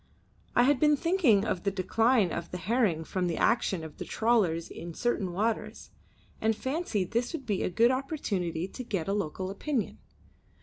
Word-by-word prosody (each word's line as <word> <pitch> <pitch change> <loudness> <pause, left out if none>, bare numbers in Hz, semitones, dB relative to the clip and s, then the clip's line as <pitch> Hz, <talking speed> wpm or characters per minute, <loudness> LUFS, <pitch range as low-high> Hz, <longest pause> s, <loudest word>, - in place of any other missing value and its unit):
I 245 - +6
had 275 +1 +3
been 300 -1 +4
thinking 310 - +3
of 200 -5 -1
the 200 - +1
decline 205 +2 +2
of 170 - -4
the 180 - -5
herring 190 -4 +1
from 180 +2 -2
the 170 - -2
action 195 -7 +1
of 160 -1 -9
the - - -3
trawlers 205 -8 +1
in 170 -1 -8
certain 215 -6 -1
waters, 215 +5 -2 0.5
and 220 0 +2
fancied 260 - -2
this 240 +4 0
would 290 -5 -5
be 205 -5 -1
a - - 0
good 230 +7 +4
opportunity 200 - -2
to 255 - -8
get 195 -8 -3
a 195 - 0
local 190 -1 -2
opinion. 250 +3 -2
210 Hz, 180 wpm, -29 LUFS, 180-245 Hz, 0.5 s, I